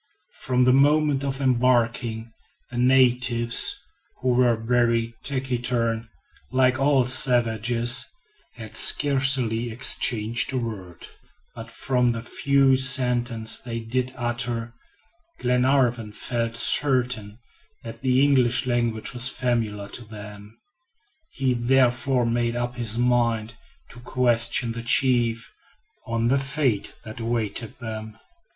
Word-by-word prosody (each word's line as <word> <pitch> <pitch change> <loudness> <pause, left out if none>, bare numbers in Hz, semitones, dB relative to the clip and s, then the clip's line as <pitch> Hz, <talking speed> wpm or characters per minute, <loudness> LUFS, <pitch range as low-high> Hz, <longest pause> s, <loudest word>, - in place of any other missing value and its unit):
From 125 -1 0
the 125 0 +3
moment 145 0 +2
of 135 -1 -4
embarking, 120 -3 0 0.4
the 120 - -7
natives, 125 -2 +3 0.4
who 130 - -2
were 125 -1 +2
very 115 0 0
taciturn, 120 -4 -2 0.4
like 130 0 +1
all 135 -2 +2
savages, 120 -2 +3 0.5
had 110 -2 -11
scarcely 130 -5 +3
exchanged 115 0 0
a - - -1
word, 100 -8 -7 0.5
but 115 -1 -10
from 125 0 -1
the 115 0 -7
few 135 +1 +1
sentences 125 -4 +1
they 115 -1 -5
did 125 +3 -3
utter, 120 -1 -3 0.6
Glenarvan 125 -3 0
felt 115 +1 -4
certain 125 -6 +2 0.5
that 115 0 -10
the 130 0 +2
English 130 -3 +2
language 120 -3 -2
was 125 +1 0
familiar 115 -6 -3
to 120 - -7
them. 105 -1 -12 0.7
He 130 -2 -1
therefore 125 +1 +1
made 120 0 -1
up 120 0 -3
his 115 -2 -1
mind 120 -2 0 0.4
to 120 - -13
question 120 -1 +1
the 115 0 -6
chief 120 -1 +1 0.5
on 115 0 -1
the 135 +2 +2
fate 135 -6 -2
that 110 +1 -10
awaited 115 -1 -4
them. 110 -2 -8
120 Hz, 115 wpm, -23 LUFS, 115-130 Hz, 0.7 s, the